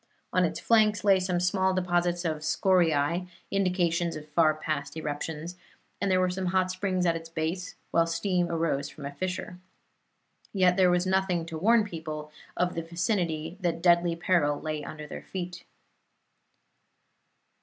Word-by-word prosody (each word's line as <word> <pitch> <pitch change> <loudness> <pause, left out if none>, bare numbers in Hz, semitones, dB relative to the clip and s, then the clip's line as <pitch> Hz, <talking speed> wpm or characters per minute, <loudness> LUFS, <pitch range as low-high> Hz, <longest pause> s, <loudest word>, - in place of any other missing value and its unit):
On - - +4
its - - -1
flanks 215 -4 +3
lay 195 -2 +5
some 180 -1 0
small 190 +1 +1
deposits 175 -1 0
of 160 -2 0
scoriae, 170 -1 +2 0.2
indications 175 -3 +1
of 150 0 -8
far 155 0 +3
past 155 -1 -4
eruptions, 160 +3 -4 0.4
and 200 - +1
there 185 -1 +3
were 185 0 +2
some 185 0 -3
hot 185 0 +1
springs 185 -1 -1
at 170 -1 +2
its 165 0 -7
base, 165 +3 -3 0.2
while 165 0 +3
steam 175 +1 0
arose 160 -4 -1
from 145 - -10
a 140 - -4
fissure. 180 +3 -4 0.9
Yet 185 -2 +4
there 185 -1 +5
was 180 +1 +2
nothing 185 -3 +1
to 165 -1 -7
warn 225 +5 +5
the 210 - -7
people 155 -2 -6 0.3
of 180 0 +1
the 165 - -2
vicinity 170 -1 -2
that 170 -2 0
deadly 170 -1 +4
peril 165 -4 +1
lay 155 -1 -4
under 150 0 -7
their - - -8
feet. 180 -1 -6
175 Hz, 160 wpm, -28 LUFS, 160-185 Hz, 0.9 s, lay